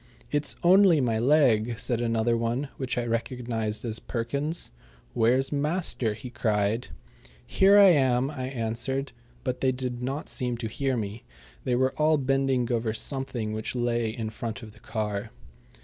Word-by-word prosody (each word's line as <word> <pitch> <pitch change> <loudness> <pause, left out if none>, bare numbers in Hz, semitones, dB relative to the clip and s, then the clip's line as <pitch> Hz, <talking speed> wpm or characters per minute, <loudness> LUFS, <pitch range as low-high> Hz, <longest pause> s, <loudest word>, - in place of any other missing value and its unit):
"It's 145 0 +2
only 185 -2 +6
my 115 -4 +1
leg!" 120 -4 +3
said 120 0 -1
another 115 0 +1
one, 120 +5 -1
which 130 -2 -3
I 120 - 0
recognized 115 -2 -2
as 110 -1 -2
Perkins's. 140 - -2 0.4
"Where's 125 +2 +2
master?" 145 - 0
he 120 +4 -9
cried. 110 -1 0 0.6
"Here 195 +1 +5
I 200 -1 +9
am," 135 -4 +3
I 130 -4 -5
answered, 130 +2 -2 0.3
but 125 -2 -3
they 130 - +3
did 125 -1 -4
not 135 +4 -3
seem 125 -3 -1
to 115 - -4
hear 130 +3 -1
me. 105 +1 -5 0.4
They 125 - +1
were 130 +1 +1
all 155 0 +4
bending 135 -2 +1
over 115 -2 0
something 120 -3 -2
which 110 +3 -4
lay 120 -2 0
in 110 -1 -4
front 115 +2 -5
of 110 - -10
the - - -18
car. 105 -1 -3
125 Hz, 160 wpm, -27 LUFS, 115-135 Hz, 0.6 s, I